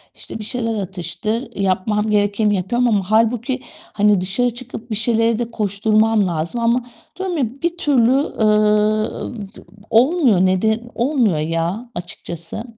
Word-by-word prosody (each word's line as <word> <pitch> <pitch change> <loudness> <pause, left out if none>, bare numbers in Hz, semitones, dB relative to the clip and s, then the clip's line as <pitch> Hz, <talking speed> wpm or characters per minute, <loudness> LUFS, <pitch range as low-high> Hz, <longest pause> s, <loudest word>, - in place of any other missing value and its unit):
işte, - - -8
bir - - -5
şeyler 230 0 -1
atıştır, 200 +6 -3
yapmam 210 +3 0
gerekeni 205 0 +2
yapıyorum 240 +7 0
ama 200 -2 0
hâlbuki, 235 +3 +2 0.3
hani, 205 -2 +3
dışarı 215 +7 +1
çıkıp 240 -1 -8
bir - - 0
şeylere 230 +1 +2
de 235 -1 -3
koşturmam 215 0 +2
lazım 170 +8 -3
ama 235 +2 +3 0.4
diyorum 370 -3 -2
ya 265 - +2 0.2
bir 340 0 -1
türlü, 255 -6 +3
eee, 215 -3 +1
t - - -13 0.3
olmuyor. 240 - +4
Nede 220 +5 +1
olmuyor 240 - +1
ya, 165 +9 -2
açıkçası. 170 +3 -6
215 Hz, 135 wpm, -19 LUFS, 200-240 Hz, 0.4 s, olmuyor